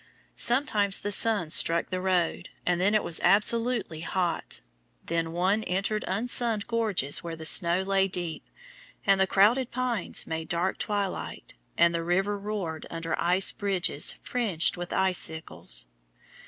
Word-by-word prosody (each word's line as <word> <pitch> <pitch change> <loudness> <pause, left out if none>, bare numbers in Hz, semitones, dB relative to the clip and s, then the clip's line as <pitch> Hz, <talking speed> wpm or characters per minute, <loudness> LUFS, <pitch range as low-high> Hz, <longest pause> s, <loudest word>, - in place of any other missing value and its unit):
Sometimes 225 -6 +1
the 205 - -3
sun 205 -6 +3
struck 170 +1 +4
the 185 0 -2
road, 185 -3 -1 0.2
and 180 0 +1
then 205 +3 +2
it 215 - +2
was 165 - 0
absolutely 225 -4 +2
hot; 175 - -2 0.5
then 165 -1 -2
one 190 +6 0
entered 195 +3 -1
unsunned 220 +1 +1
gorges 215 - +1
where 170 -1 -5
the 160 -1 -9
snow 175 +2 +4
lay 195 0 +2
deep, 175 -4 -5 0.6
and 195 -1 +3
the 190 - +3
crowded 230 +7 +3
pines 245 -6 -2
made 160 0 -5
dark 175 +2 -1
twilight, 205 -3 -4 0.2
and 170 0 +4
the 165 0 -2
river 190 +4 0
roared 195 -6 -5
under 165 0 -3
ice 180 +3 +4
bridges 185 -7 0
fringed 210 -10 -1
by 175 0 -6
icicles. 160 - 0
190 Hz, 140 wpm, -27 LUFS, 170-210 Hz, 0.6 s, struck